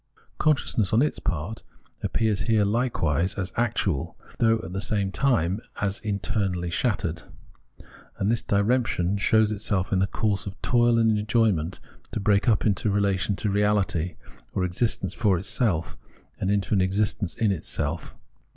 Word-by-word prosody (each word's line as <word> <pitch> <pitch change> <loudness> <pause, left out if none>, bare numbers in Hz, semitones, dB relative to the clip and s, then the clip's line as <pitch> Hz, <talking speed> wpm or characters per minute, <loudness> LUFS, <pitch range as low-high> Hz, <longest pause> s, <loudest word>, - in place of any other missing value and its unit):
Consciousness, 130 -9 +1
on 115 +5 +5
its 150 - -1
part, 90 +6 -3 0.4
appears 110 -3 0
here 110 -3 +3
hkewise 95 - 0
as 95 -2 -3
actual, 110 - -1 0.2
though, 115 -1 +4
at 90 - -7
the 95 - -2
same 100 -2 0
time, 100 -7 +1 0.2
as 100 -1 -1
internally 100 -4 -2
shattered; 90 -5 -1 1.0
and 100 +3 +1
this 115 - +1
diremption 100 -3 +1
shows 110 0 +3
itself 100 -2 -1
in 95 - +3
the 95 - +2
course 105 -2 -1
of 100 - -8
toil 120 -1 +3
and 110 -2 +3
enjoyment, 105 -6 +1 0.3
to - - -1
break 100 +2 +2
up 105 - +2
into 110 +1 +1
a - - +1
relation 100 0 +1
to 105 - -1
reahty, 100 -5 +1 0.4
or 95 - +1
existence 90 +6 -1
for 100 -5 +2
itself, 100 -2 -1 0.4
and 95 - -1
into 100 0 0
an 95 - +3
existence 100 0 0
in 110 -3 +1
itself. 80 -2 -3
100 Hz, 150 wpm, -25 LUFS, 95-110 Hz, 1.0 s, on